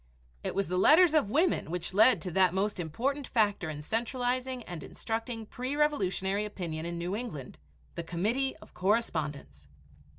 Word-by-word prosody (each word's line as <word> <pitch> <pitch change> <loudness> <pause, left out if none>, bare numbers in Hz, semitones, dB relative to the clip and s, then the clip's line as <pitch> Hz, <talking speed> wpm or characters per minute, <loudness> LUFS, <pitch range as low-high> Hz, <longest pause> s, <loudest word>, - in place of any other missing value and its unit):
It - - -2
was 195 0 0
the 180 +2 0
letters 320 - +6
of 300 -10 +3
women 315 - +2
which 175 +1 -4
led 215 -3 +5
to 180 - -3
that 185 0 +3
most 200 0 0
important 255 - -2
factor 205 -7 +1
in 150 -1 -6
centralizing 250 - -1
and 175 -6 -7
instructing 225 - -4
pre 255 +5 -4
revolutionary 205 -9 +1
opinion 170 -6 -4
in 170 0 -4
New 175 +3 -2
England, 210 - -6 0.3
the 170 - -4
Committee 215 +11 0
of - - -18
Correspondence. 155 - -1
205 Hz, 160 wpm, -30 LUFS, 170-250 Hz, 0.3 s, letters